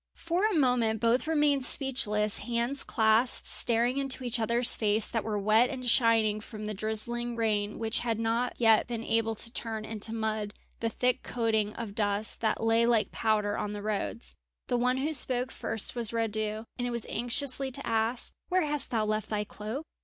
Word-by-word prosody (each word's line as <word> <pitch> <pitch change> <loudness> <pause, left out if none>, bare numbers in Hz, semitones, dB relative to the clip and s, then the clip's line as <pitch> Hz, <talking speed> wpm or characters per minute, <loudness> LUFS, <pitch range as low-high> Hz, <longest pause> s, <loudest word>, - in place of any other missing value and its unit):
For 355 +5 0
a 430 - -1
moment 245 -5 +2
both 235 +6 +1
remained 295 -4 +2
speechless, 215 -7 +2
hands 240 +3 0
clasped, 220 +2 +2
staring 240 +3 +1
into 270 -1 -1
each 240 -1 -1
other's 235 +2 +4
face 215 0 +2
that 225 -3 -2
were 215 -2 -2
wet 215 +4 +3
and 255 -2 -6
shining 225 -3 +3
from 215 -1 -8
the 215 - -3
drizzling 235 +3 -1
rain 210 -2 -1
which 225 -1 -1
had 230 -2 -2
not 230 +2 -1
yet 225 -2 +4
been 235 -1 -4
able 225 0 0
to 230 +2 -3
turn 220 -2 -2
into 220 0 -1
mud 215 -2 -3 0.2
the 230 - -1
thick 250 +2 0
coating 220 -3 -1
of 220 -4 -6
dust 205 0 -1
that 220 0 0
lay 225 +1 +3
like 230 -3 +2
powder 210 -2 0
on 210 - -3
the 205 0 -6
roads. 215 +2 -3 0.4
The 245 - +1
one 250 +1 +1
who 295 +4 -1
spoke 255 -2 +2
first 225 -2 -3
was 235 -3 +1
Radu, 220 -1 -2
and 245 - -1
it - - -3
was 235 -2 -1
anxiously 265 +2 0
to 275 +2 -5
ask: 225 +2 -1 0.2
"Where 365 0 +2
hast 295 -1 -1
thou 220 -3 0
left 215 0 -2
thy 210 -1 -1
cloak? 215 +8 -7
230 Hz, 190 wpm, -29 LUFS, 215-245 Hz, 0.4 s, other's